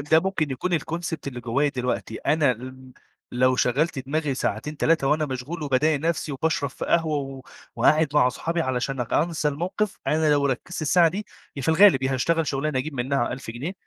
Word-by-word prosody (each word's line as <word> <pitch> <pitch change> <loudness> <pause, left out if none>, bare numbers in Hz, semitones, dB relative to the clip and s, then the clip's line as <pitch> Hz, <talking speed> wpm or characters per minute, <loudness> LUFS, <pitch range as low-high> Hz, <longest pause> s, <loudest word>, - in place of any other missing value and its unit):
ده 155 +3 +4
ممكن 185 -6 -1
يكون 170 +6 0
الconcept 170 +2 -4
اللي 125 -3 -5
جوّايا 125 +5 +1
دلوقتي. 125 -4 -3
أنا 150 -3 +2
ل 130 +2 -10 0.4
لو 130 +1 +3
شغّلت 145 +6 +1
دماغي 150 0 -1
ساعتين، 130 +5 -3
3 160 -2 +2
وأنا 155 +1 +2
مشغول 135 +5 -5
وباضايق 145 +1 +1
نفسي 160 -1 -1
وباشرب 140 -1 -1
في - - -6
قهوة 160 -3 +1
و 135 -1 -6 0.4
وقاعد 155 0 +4
مع 135 -4 +5
صحابي 165 +6 -2
علشان 130 -2 -1
ك 115 - -8
أنسى 160 -1 +1
الموقف، 180 +8 -2
أنا 155 0 +2
لو 145 -1 +3
ركّزت 140 +6 -3
الساعة 170 +3 +4
دي، 195 +5 -5 0.3
يا 140 - -4
في - - -2
الغالب 160 -4 +6
يا 135 0 0
هاشتغل 165 +5 +1
شُغلانة 140 0 -1
أجيب 145 +3 -4
منها 130 0 0
1000 125 -2 -7
جنيه 130 +10 -5
145 Hz, 190 wpm, -24 LUFS, 130-160 Hz, 0.4 s, الغالب